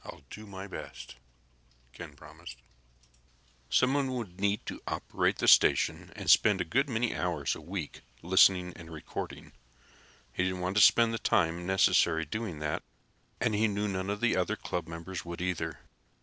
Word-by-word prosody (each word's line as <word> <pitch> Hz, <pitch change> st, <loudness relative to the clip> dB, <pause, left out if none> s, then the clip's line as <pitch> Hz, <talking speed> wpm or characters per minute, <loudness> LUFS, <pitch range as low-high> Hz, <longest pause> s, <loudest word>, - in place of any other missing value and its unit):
"I'll -, -, -11 dB
do 110 Hz, 0 st, -9 dB
my 95 Hz, -1 st, -8 dB
best," 100 Hz, -, -9 dB, 0.8 s
Ken 80 Hz, -2 st, -10 dB
promised. -, -, -12 dB, 1.1 s
Someone 135 Hz, +1 st, +2 dB
would 105 Hz, -8 st, -6 dB
be -, -, -11 dB
needed 100 Hz, +1 st, 0 dB
to -, -, -7 dB
operate -, -, -1 dB
the -, -, -1 dB
station -, -, +4 dB
and -, -, -8 dB
spend 105 Hz, -3 st, +5 dB
a 90 Hz, -, -1 dB
good 135 Hz, -, 0 dB
many 120 Hz, -1 st, -1 dB
hours 85 Hz, -5 st, -1 dB
a -, -, -8 dB
week 85 Hz, -1 st, -6 dB, 0.2 s
listening 90 Hz, 0 st, +4 dB
and 85 Hz, -1 st, -11 dB
recording. 80 Hz, -2 st, -7 dB, 0.8 s
He 90 Hz, -, 0 dB
didn't 95 Hz, -1 st, -2 dB
want 90 Hz, +2 st, -2 dB
to -, -, +6 dB
spend 115 Hz, +1 st, +6 dB
the 115 Hz, -, -2 dB
time 85 Hz, -1 st, +1 dB
necessary 85 Hz, -3 st, +3 dB
doing 105 Hz, 0 st, -5 dB
that, 75 Hz, 0 st, -3 dB, 0.6 s
and 115 Hz, -, 0 dB
he 110 Hz, +2 st, +2 dB
knew 105 Hz, 0 st, -2 dB
none 95 Hz, -1 st, -3 dB
of 105 Hz, 0 st, -3 dB
the 120 Hz, -1 st, +2 dB
other 90 Hz, -1 st, 0 dB
club 90 Hz, -2 st, -5 dB
members 85 Hz, +3 st, -7 dB
would, 85 Hz, 0 st, -7 dB
either. 90 Hz, -1 st, -3 dB
95 Hz, 170 wpm, -30 LUFS, 85-105 Hz, 1.1 s, to